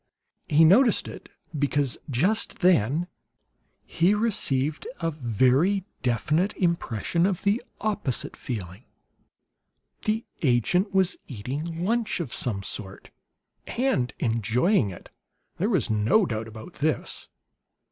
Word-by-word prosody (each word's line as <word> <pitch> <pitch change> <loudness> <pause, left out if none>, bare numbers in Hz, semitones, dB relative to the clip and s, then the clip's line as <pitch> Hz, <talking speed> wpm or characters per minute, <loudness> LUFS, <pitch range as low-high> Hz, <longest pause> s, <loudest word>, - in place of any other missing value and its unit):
He 155 +2 +5
noticed 225 +7 +5
it - - -10 0.3
because, 145 -2 0
just 185 - 0
then, 165 - +3 0.8
he 180 +5 +2
received 155 - 0
a 165 -1 -1
very 135 - +2 0.2
definite 150 - 0
impression 170 - 0
of 190 -3 -2
the 205 +4 +2 0.2
opposite 205 - -1
feeling; 100 -2 -6 1.2
the 220 +1 0 0.2
agent 160 - +2
was 190 -2 +2
eating 145 +9 -5
lunch 225 +1 0
of 150 -9 -4
some 100 -6 -1
sort, 95 -1 -7 0.6
and 230 - 0
enjoying 115 - +2
it. 90 - -11 0.5
There - - 0
was - - +1
no 110 - +3
doubt 110 -5 -3
about 110 +10 -10
this. 155 +1 -2
155 Hz, 110 wpm, -26 LUFS, 120-190 Hz, 1.2 s, He